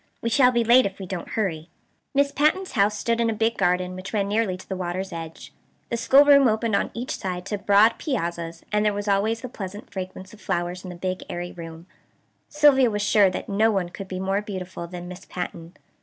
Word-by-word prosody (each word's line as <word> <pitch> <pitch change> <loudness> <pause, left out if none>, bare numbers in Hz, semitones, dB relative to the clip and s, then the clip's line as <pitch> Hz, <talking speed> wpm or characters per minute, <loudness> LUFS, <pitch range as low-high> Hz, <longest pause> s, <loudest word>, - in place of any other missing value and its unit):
We 230 - -2
shall 255 -1 +5
be 235 -1 +2
late 240 0 +6
if 195 - -9
we 195 - -7
don't 180 -1 -6
hurry." 165 -7 -2 0.5
Miss 280 0 +3
Patten's 310 +7 +1
house 210 -2 +2
stood 230 +2 0
in 230 - +2
a 225 - -1
big 225 +2 +1
garden 180 -1 0
which 185 +3 -8
ran 200 -2 +1
nearly 205 -3 0
to 185 - -14
the 190 - -3
water's 185 +1 -4
edge. 165 -1 -8 0.4
The - - +1
schoolroom 280 +3 +6
opened 220 -1 +1
on - - 0
each 245 +3 -3
side 180 -1 -4
to 205 0 -3
broad 205 +3 +4
piazzas, 170 - -3
and 210 0 +2
there 210 -1 +2
was 205 +1 -4
always 210 +3 +1
the 255 - -5
pleasant 205 -3 -8
fragrance 185 0 -7
of 215 - -15
flowers 175 +1 -2
in 185 - -7
the 180 - -7
big 185 +1 -3
airy 175 0 -5
room. 165 -1 -9 0.6
Sylvia 290 -4 +5
was 210 -1 -2
sure 205 -2 +5
that 185 - -5
no 215 +2 +2
one 190 -5 0
could 195 +2 -8
be 185 -1 -5
more 195 +2 0
beautiful 185 -4 -6
than 175 0 -8
Miss 180 +1 -10
Patten. 175 -1 -6
200 Hz, 220 wpm, -24 LUFS, 180-225 Hz, 0.6 s, late